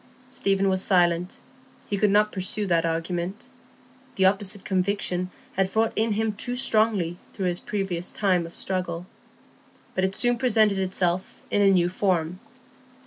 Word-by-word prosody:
Stephen 195 -5 +1
was 190 -1 +2
silent; 175 -1 +1 0.5
he 205 - -1
could 205 +1 +2
not 210 +1 +3
pursue 195 +2 -1
that 170 -3 +2
argument; 175 +7 -3 0.7
the 190 - +3
opposite 195 0 +2
conviction 185 -1 0 0.2
had 190 0 +1
wrought 225 0 +2
in 225 0 +1
him 220 +1 0
too 245 +4 -4
strongly 215 -8 +1 0.2
through 195 - -3
his 175 -1 0
previous 190 -4 -3
time 185 -5 +1
of 170 - -10
struggle. 180 -2 -2 0.9
But 185 - -1
it 190 +1 0
soon 240 -1 +1
presented 215 -5 +3
itself 185 -1 -1
in 205 - +2
a 200 - +5
new 180 -3 +3
form. 180 -2 -1
190 Hz, 150 wpm, -25 LUFS, 180-210 Hz, 0.9 s, a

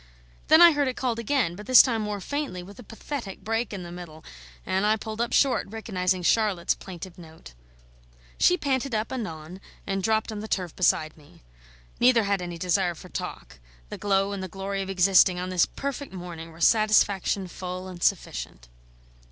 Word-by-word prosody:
Then 320 +2 +8
I 340 - +9
heard 290 -2 +1
it 255 - -2
called 240 -3 -1
again, 230 -7 0
but 210 +4 -10
this 255 -2 +9
time 230 -4 -1
more 210 -1 -3
faintly, 280 -6 -4
with 200 +6 -13
a - - -9
pathetic 225 -1 -7
break 225 +2 -1
in 195 -3 -6
the 175 - -9
middle; 170 -3 -10 0.4
and 190 +1 0
I 215 +1 +3
pulled 220 +1 -5
up 235 - -1
short, 275 -2 +2
recognising 185 -4 -2
Charlotte's 200 -3 +2
plaintive 180 -1 -10
note. 160 - -13 0.9
She 360 - +5
panted 270 -5 -1
up 215 +1 -2
anon, 175 -6 -6 0.2
and 195 0 -2
dropped 220 +3 0
on 215 - -5
the 215 - -6
turf 180 -6 -3
beside 155 -4 +1
me. 145 - -20 0.6
Neither 240 -2 +5
had 200 -2 0
any 175 -1 -6
desire 180 0 0
for - - -13
talk; 60 - -7 0.3
the - - -6
glow 195 0 +1
and 200 -1 -4
the 190 - -4
glory 195 +2 -4
of 190 - -5
existing 185 -1 +4
on 180 +1 -4
this 180 -2 +2
perfect 280 0 -5
morning 175 -3 -8
were 165 +1 -14
satisfaction 205 -3 +3
full 185 +1 -6
and 180 -2 -10
sufficient. 65 - -2
195 Hz, 185 wpm, -26 LUFS, 180-225 Hz, 0.9 s, I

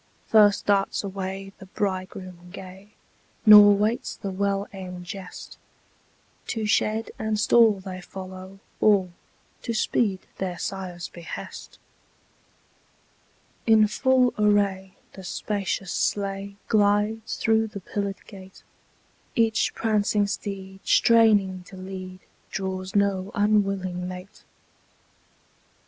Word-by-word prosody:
First 210 -2 +4
darts 200 0 +1
away 195 0 -5
the 195 - -12
bridegroom 185 -2 -4
gay, 190 +2 -11 0.6
Nor 210 -1 +10
waits 215 +4 -1
the 195 - -5
well 200 +1 -1
aimed 180 -2 -8
jest: 185 0 -9 0.9
To 220 -2 -2
shed 220 +1 +1
and 220 -1 -1
stall 220 -2 +5
they 185 -1 -7
follow, 185 +1 -9 0.2
all, 195 -4 +3 0.5
To 230 -2 -3
speed 205 -3 +1 0.2
their 180 -2 -3
sire's 185 -3 -5
behest. 170 -1 -9 1.9
In 220 -1 +6
full 255 +3 +2
array, 200 -2 +1 0.2
the 190 - -10
spacious 195 0 -3
sleigh 200 0 -2
Glides 210 +1 +1
through 225 0 +2
the 205 -2 -8
pillared 200 +1 -4
gate: 190 -2 -13 0.7
Each 225 -1 +2
prancing 210 -2 +1
steed, 195 -1 -5
straining 210 -5 +4
to 190 - -12
lead, 185 0 -8 0.3
Draws 190 0 -4
no 200 -1 +1
unwilling 195 -3 +1
mate. 185 +2 -9
195 Hz, 105 wpm, -25 LUFS, 185-210 Hz, 1.9 s, Nor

